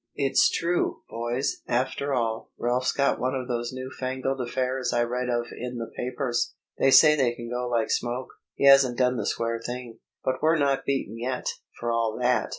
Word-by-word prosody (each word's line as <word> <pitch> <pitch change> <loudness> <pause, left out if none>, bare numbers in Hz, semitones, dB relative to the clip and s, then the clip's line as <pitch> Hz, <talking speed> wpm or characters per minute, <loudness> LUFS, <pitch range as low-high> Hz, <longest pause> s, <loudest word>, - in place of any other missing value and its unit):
"It's 135 -2 +3
true, 170 +1 -1
boys, 120 +4 -2
after 130 +3 -1
all; 115 -4 -1
Ralph's 125 +1 +1
got 140 0 +1
one 130 +1 0
of 130 -1 -3
those 120 -1 -2
new 130 0 -6
fangled 130 +1 -2
affairs 130 0 -1
I 120 0 +2
read 125 +1 -2
of 120 -1 0
in 125 0 -5
the 115 -1 -5
papers. 125 -1 -2 0.2
They - - +4
say 150 +3 +8
they 130 -5 +2
can 120 0 -8
go 125 0 -2
like 115 -2 0
smoke. 125 +2 -1 0.3
He - - 0
hasn't 135 -3 +7
done 125 -1 +2
the - - -2
square 115 0 -1
thing. 120 -2 -6 0.2
But 130 0 -1
we're 160 +2 +4
not 140 -2 +1
beaten 125 -5 -2
yet, 125 +2 -3 0.3
for 120 0 -1
all 115 -1 0
that!" 125 0 +2
125 Hz, 190 wpm, -26 LUFS, 120-130 Hz, 0.3 s, say